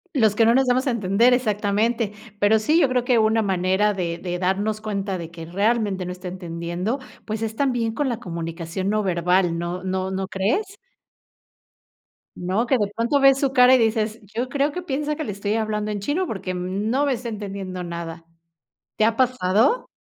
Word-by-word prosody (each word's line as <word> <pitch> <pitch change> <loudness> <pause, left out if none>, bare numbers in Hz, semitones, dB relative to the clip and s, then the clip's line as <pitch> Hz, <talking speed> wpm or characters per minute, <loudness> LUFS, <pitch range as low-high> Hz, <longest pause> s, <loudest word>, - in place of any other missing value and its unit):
Los 220 -5 +3
que 230 - +4
no 230 +1 +5
nos 265 +1 +4
damos 255 +2 +1
a - - +3
entender, 230 +2 +3
exactamente. 215 -1 0 0.3
Pero 210 +2 +4
sí, 300 +10 +2
yo 270 - +4
creo 250 -1 0
que 245 -2 +3
una 220 0 +3
manera 190 +2 +1
de 170 -3 -3
de 175 -1 -4
darnos 205 +4 0
cuenta, 200 -3 -3
de 165 -1 -6
que 165 -1 -9
realmente 200 +1 0
no 180 - -4
está 180 +1 -8
entendiendo, 175 +5 -3 0.3
pues, 215 0 -3
es 220 0 -3
también 245 -4 0
con 285 +3 -1
la 235 -2 -3
comunicación 170 0 -4
no 215 0 +1
verbal, 180 -1 +1
¿no 175 +2 -4
no 190 0 -2
no 190 0 -3
crees? 205 - 0 1.7
¿No? 185 +6 -1
Que 260 - +3
de 205 -3 +1
pronto 235 +5 +1
ves 275 0 +5
su 275 -2 +1
cara, 250 -1 +7
y - - +5
dices: 225 -1 0 0.2
"Yo 245 +2 -1
creo 285 +2 +1
que 360 +5 -5
piensa, 300 -1 -2
que 310 - -4
le 210 - -4
estoy 200 +2 -2
hablando 215 -1 -1
en 205 - -3
chino, 305 - -1
porque, 190 - -4
mm, 185 +4 -2
no 270 +5 +2
me 280 - +2
está 240 -1 -5
entendiendo 195 -4 -5
nada", 170 -1 -6 0.7
¿te 215 - +3
ha 225 0 +2
pasado? 250 - +2
210 Hz, 200 wpm, -23 LUFS, 185-240 Hz, 1.7 s, cara